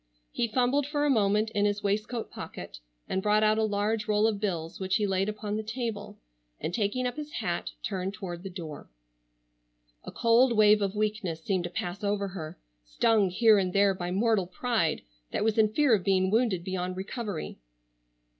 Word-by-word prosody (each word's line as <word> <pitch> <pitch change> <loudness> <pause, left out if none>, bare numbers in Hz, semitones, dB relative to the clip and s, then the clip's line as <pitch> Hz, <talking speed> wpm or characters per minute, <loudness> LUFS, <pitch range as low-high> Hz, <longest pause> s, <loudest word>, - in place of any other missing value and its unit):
He 235 - 0
fumbled 255 +5 +1
for 295 0 0
a 290 - +3
moment 215 -1 +2
in 205 -2 +1
his 205 0 0
waistcoat 210 +3 -2
pocket - - -8 0.3
and 190 - -1
brought 210 +1 +3
out 215 0 +3
a - - +2
large 215 +1 0
roll 210 0 +3
of 220 -2 +1
bills 175 -3 -3
which 190 -1 0
he 210 - +2
laid 195 +1 0
upon 210 0 -4
the - - -1
table, 225 -2 -5 0.4
and 170 - -4
taking 220 +4 0
up 250 +2 -3
his 300 0 -6
hat 175 -7 -2
turned 190 0 -3
toward 175 -3 -6
the 195 - -6
door. 165 -5 -8 1.1
A - - -8
cold 235 0 +3
wave 210 0 +6
of 200 0 -1
weakness 210 -6 -2
seemed 185 -3 0
to - - -3
pass 175 +2 -5
over 200 -1 0
her, 165 -4 -7 0.3
stung 195 - +2
here 215 +2 +5
and 185 -2 -1
there 200 0 +4
by 175 -1 -4
mortal 200 0 +1
pride 185 -4 -1 0.3
that - - -1
was 220 0 +1
in 215 -1 +4
fear 285 +1 +3
of 200 -4 +2
being 190 -1 +2
wounded 220 -6 +1
beyond 185 0 -3
recovery. 200 - -5
205 Hz, 190 wpm, -28 LUFS, 185-220 Hz, 1.1 s, wave